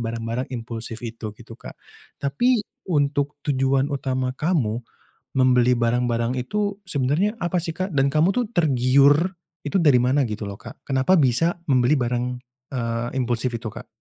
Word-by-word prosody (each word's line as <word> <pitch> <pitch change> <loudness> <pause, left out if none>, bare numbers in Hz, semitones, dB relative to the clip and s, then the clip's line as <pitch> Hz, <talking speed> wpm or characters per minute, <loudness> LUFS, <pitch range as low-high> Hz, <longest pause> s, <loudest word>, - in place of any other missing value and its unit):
barang-barang 115 +2 -3
impulsif 115 0 -5
itu 110 -2 -6
gitu 115 -1 -13
Kak, - - -10 0.5
tapi 215 - +2 0.3
untuk 145 -3 0
tujuan 135 0 +1
utama 130 -2 -1
kamu 130 -7 0 0.6
membeli 125 -1 +4
barang-barang 120 +1 0
itu 205 +8 -2
sebenarnya 155 - +1
apa 175 -1 0
sih, 165 0 -5
Kak? 185 -1 -3
Dan 140 -1 +2
kamu 155 +6 +3
itu 250 +2 +1
tergiur 140 - +4 0.5
itu 145 - -2
dari 145 -7 +5
mana 130 +3 +2
gitu 105 -2 -4
loh, 100 - -6
Kak? - - -12
Kenapa 135 +7 +3
bisa 165 +7 +2
membeli 125 +1 +4
barang, 120 0 0 0.5
eee, 115 -1 -2
impulsif 125 0 0
itu, 115 -1 -4
Kak? 115 +4 -9
130 Hz, 150 wpm, -23 LUFS, 120-150 Hz, 0.6 s, dari